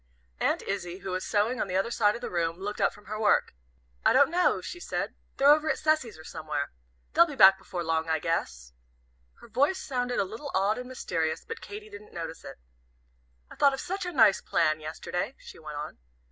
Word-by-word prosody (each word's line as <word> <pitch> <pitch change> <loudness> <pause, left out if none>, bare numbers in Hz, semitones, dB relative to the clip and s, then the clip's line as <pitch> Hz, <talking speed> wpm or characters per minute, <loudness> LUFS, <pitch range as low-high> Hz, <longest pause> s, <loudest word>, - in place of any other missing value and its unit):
Aunt - - +1
Izzie, 185 -2 -4
who 190 - -3
was 185 0 -2
sewing 220 +4 +1
on - - -1
the 185 - -3
other 195 +5 +1
side 210 -3 +3
of 235 - -7
the - - -4
room, 165 -1 -1
looked 205 +2 -4
up - - +4
from 205 - -17
her 215 +1 -5
work. 210 -2 +3 0.5
"I - - +5
don't 280 +1 +5
know," 355 +1 +3
she 350 - -7
said, - - -3 0.2
"they're 280 +1 +7
over 310 +1 0
at - - +1
Cecy's, 310 - +1
or 160 - -12
somewhere. 155 -3 -4 0.4
They'll 340 - +6
be 295 - -7
back 190 -4 +8
before 180 -2 -5
long, 160 0 0
I 160 - +2
guess." 65 - -3 0.7
Her - - -13
voice 280 - +2
sounded 245 -6 -2
a - - +3
little 225 +9 -7
odd 200 +4 +2
and 250 - -7
mysterious, 160 -10 -2
but 455 +1 -7
Katy 420 +1 -8
didn't 430 +2 -12
notice 165 - -6
it. 135 - -9 0.9
"I - - -10
thought 280 -1 +4
of - - -9
such 380 0 -3
a - - -3
nice 225 - +5
plan 155 0 +1
yesterday," 175 - -4
she - - -13
went 150 -2 -7
on. 150 - -6
205 Hz, 215 wpm, -28 LUFS, 165-275 Hz, 0.9 s, back